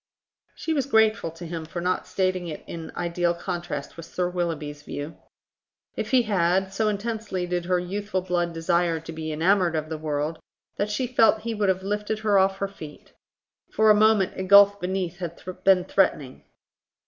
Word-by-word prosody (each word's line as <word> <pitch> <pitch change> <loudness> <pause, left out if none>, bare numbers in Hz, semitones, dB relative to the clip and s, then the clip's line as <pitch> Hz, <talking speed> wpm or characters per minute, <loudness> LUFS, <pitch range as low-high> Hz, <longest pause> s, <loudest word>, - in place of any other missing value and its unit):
She 320 - -2
was 280 -4 0
grateful 220 -7 +3
to 165 +2 -10
him 165 -1 -5
for 165 +2 -6
not 180 +1 -1
stating 185 -2 -1
it 155 - -7
in 165 -1 -7
ideal 175 0 0
contrast 170 -5 -5
with 165 -1 -9
Sir 180 +1 -2
Willoughby's 155 -5 -3
view. 145 +2 -6 0.8
If - - -3
he 255 -2 +4
had, 190 -2 +1
so 215 +2 0
intensely 210 -3 -2
did 175 -1 -2
her 180 0 +2
youthful 190 +2 -3
blood 175 -1 0
desire 165 0 +1
to 165 +1 -9
be 160 -1 -5
enamoured 175 +2 +2
of 155 0 -2
the 160 -1 -4
world, 150 +1 -2 0.4
that 205 - -1
she 210 +5 -1
felt 225 -3 +3
he 230 +1 -3
would 205 -2 0
have 190 0 0
lifted 210 +2 -2
her 205 -2 +5
off 195 0 +2
her 200 - -1
feet. 155 -6 -12 0.6
For 220 0 +4
a - - +8
moment 210 -2 +3
a - - -2
gulf 200 +1 +6
beneath 180 -1 -2
had 170 -2 -6 0.2
been 190 -2 +5
threatening. 145 -9 0
180 Hz, 185 wpm, -25 LUFS, 165-205 Hz, 0.8 s, a